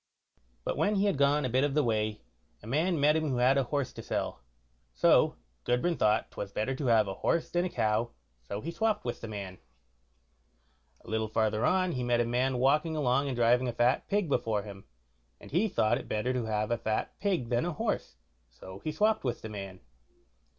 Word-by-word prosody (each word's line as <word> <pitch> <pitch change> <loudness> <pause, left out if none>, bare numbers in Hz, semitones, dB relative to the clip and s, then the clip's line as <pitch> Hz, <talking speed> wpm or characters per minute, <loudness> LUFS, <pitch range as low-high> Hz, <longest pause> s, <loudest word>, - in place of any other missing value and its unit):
But - - -2
when 210 +1 +2
he 200 +1 +2
had 200 - +2
gone 140 +1 +2
a - - -1
bit 130 +3 +2
of 145 -1 0
the 150 - +3
way, 110 -2 -1 0.4
a - - -11
man 155 +8 0
met 150 +2 +4
him 155 -1 0
who 130 - -1
had 125 +2 +4
a 135 -2 +2
horse 140 0 -2
to - - -8
sell, - - -3 0.5
so - - +4 0.3
Gudbrand 140 +8 0
thought 105 0 +2
'twas 100 - -6
better 110 +6 -1
to 135 0 -3
have 110 -3 +4
a 95 - -3
horse 165 - -1
than 175 +1 +1
a - - -2
cow, 110 -3 0 0.3
so 100 - -6
he 165 - -4
swopped 215 - 0
with 120 - -4
the - - -6
man. 100 -4 -7 1.5
A - - -17
little 110 0 -1
farther 110 0 0
on 185 -1 +2
he 125 -5 -3
met 120 -1 +1
a 120 - +2
man 125 +2 0
walking 150 +5 +2
along 140 -1 +1
and 135 - -2
driving 120 +2 +3
a 120 - -2
fat 120 +3 +2
pig 205 -3 0
before 115 -7 0
him, 100 -2 -10 0.5
and - - -13
he 180 +9 +2
thought 110 - +1
it - - -10
better 110 +4 0
to 125 -3 -1
have 105 0 -1
a 120 - 0
fat 110 -1 -2
pig 185 - -1
than 120 -1 +1
a 175 0 -2
horse, - - -2 0.3
so 95 +10 -11
he 155 - -2
swopped 215 +6 +1
with 125 -3 -3
the 110 - -5
man. 95 -3 -7
125 Hz, 215 wpm, -30 LUFS, 110-150 Hz, 1.5 s, met